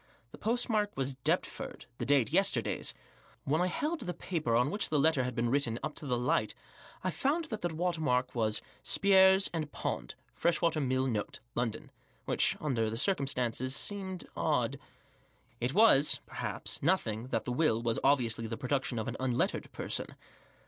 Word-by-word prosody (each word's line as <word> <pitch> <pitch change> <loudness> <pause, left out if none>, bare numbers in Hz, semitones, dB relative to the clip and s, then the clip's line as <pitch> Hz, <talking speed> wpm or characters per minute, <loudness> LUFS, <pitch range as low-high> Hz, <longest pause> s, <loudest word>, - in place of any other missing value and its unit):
The - - -12
postmark 220 -2 0
was 135 0 -1
Deptford; 130 -1 -2
the - - -3
date 140 -1 +3
yesterday's. 190 - +1 0.5
When 155 +5 +1
I 180 - +2
held 305 - -2
the 180 - -4
paper 155 -10 -1
on 125 +5 +3
which 205 - -1
the 155 - +1
letter 145 -2 +3
had 125 -1 -3
been 120 -1 0
written 125 -5 +1
op 155 - -3
to 150 - -5
the 125 -2 +1
light 120 -3 +1 0.5
I 185 - 0
found 285 - 0
that 220 -9 -5
the 175 - +1
watermark 160 -6 0
was 110 -3 +1 0.2
"Spiers 190 -1 +5
and 155 -3 -3
Pond. - - -3 0.2
Freshwater 165 -2 +1
Mill 130 -1 +1
Note. 110 -5 -2
London," 115 -2 -3 0.3
which, - - +1
under 120 -7 0
the 110 - -3
circumstances, 130 - 0
seemed 190 -2 -3
odd. - - 0 0.8
It 125 +3 -1
was, 205 -10 +6
perhaps, - - -4
nothing 125 - +1
that - - -2
the 125 - -2
will 125 -5 +2
was 115 -1 0
obviously 120 -5 +2
the 115 0 -4
production 135 -2 -1
of 110 - -2
an - - -4
unlettered 130 -2 -1
person. - - -4
140 Hz, 165 wpm, -31 LUFS, 125-180 Hz, 0.8 s, was